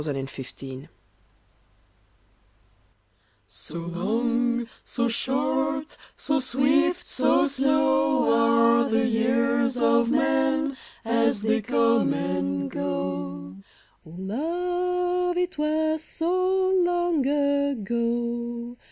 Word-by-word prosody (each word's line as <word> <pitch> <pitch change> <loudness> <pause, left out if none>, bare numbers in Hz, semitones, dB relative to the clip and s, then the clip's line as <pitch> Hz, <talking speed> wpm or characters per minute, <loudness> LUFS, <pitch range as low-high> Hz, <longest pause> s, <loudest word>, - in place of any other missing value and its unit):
AN 145 - -2
ANNIVERSARY 135 0 -8 2.6
So 170 - -9
long, 235 +8 -1 0.2
so 240 0 -1
short, 285 +5 -1 0.2
So 295 -1 0
swift, 290 +7 +1
so - - +2
slow, 275 - +2 0.5
Are 270 - -3
the 235 +2 +2
years 245 +2 +1
of 235 -1 +3
man 280 0 +1 0.3
As 230 -1 +1
they 225 +1 +1
co?ne 235 +1 +2
and 95 0 -2
go 95 0 -4 0.2
/ - - -35
O - - -13
LOVE, 355 - -2
it 360 -2 -2
was 315 +1 0
so 370 +3 0
long 350 -4 +1
ago 240 -4 -1
245 Hz, 90 wpm, -25 LUFS, 220-300 Hz, 2.6 s, of